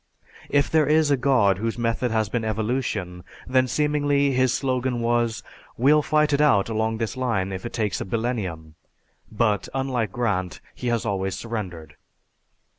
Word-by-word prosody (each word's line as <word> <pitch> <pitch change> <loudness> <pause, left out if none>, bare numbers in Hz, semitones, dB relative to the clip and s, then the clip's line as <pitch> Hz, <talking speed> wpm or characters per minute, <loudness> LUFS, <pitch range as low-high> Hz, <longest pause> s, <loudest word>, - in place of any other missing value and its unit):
If 140 0 +3
there 155 -3 +3
is 155 0 +3
a - - +5
God 120 -8 +2
whose 115 +1 -2
method 120 +1 0
has 110 -1 0
been 115 +2 -2
Evolution, 110 -5 -2 0.2
then 130 0 +2
seemingly 145 +1 +1
his 130 -1 +2
slogan 130 -2 -1
was 115 -1 0 0.3
'We'll 145 +5 +4
fight 150 0 +2
it 140 - +3
out 115 -9 +3
along 110 0 -1
this 110 -1 -3
line 115 -7 -1
if 95 +4 -5
it - - -11
takes 105 -6 -1
a - - -3
billennium' 95 -8 -3 0.6
but, 105 -3 0
unlike 130 -6 -1
Grant, 100 -6 -2
he 125 - -6
has 120 -2 0
always 95 -1 -1
surrendered. 90 -10 -6
115 Hz, 160 wpm, -24 LUFS, 105-130 Hz, 0.6 s, a